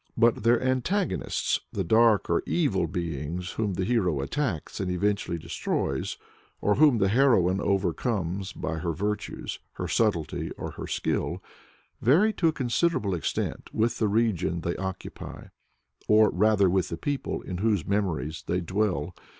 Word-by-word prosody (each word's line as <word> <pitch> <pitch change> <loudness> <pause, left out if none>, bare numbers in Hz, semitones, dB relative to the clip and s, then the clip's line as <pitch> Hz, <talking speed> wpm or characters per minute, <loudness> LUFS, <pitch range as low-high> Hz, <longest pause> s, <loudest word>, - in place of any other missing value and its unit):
But 115 0 +4
their 115 +2 +4
antagonists 130 +10 0
the 95 - -2
dark 110 +3 +4
or 85 - +2
evil 105 - +1
beings 85 +1 -4
whom 105 -4 -2
the 95 - -1
hero 90 - +1
attacks 100 - -3
and 95 - -1
eventually 95 -1 0
destroys, 70 -4 -2 0.4
or 105 - +2
whom 145 0 +5
the 100 -2 +2
heroine 100 -6 +3
overcomes 95 0 -1
by 80 -3 -4
her 85 0 -2
virtues, 105 +6 -3
her - - -4
subtlety, 100 -10 0
or - - -5
her - - -7
skill - - -2 0.6
vary 180 - +4
to 170 - +1
a - - +4
considerable 130 - 0
extent 85 - -3
with 115 +2 +1
the 110 - +2
region 100 -6 +1
they 85 +1 -2
occupy, 95 0 -6 0.6
or 110 0 +5
rather 105 +1 +3
with 90 0 +1
the 85 - -4
people 145 +8 -3
in 90 -1 -5
whose 105 -5 +1
memories 85 -6 -1
they 90 - +1
dwell. 90 -3 -1
100 Hz, 150 wpm, -27 LUFS, 90-115 Hz, 0.6 s, whom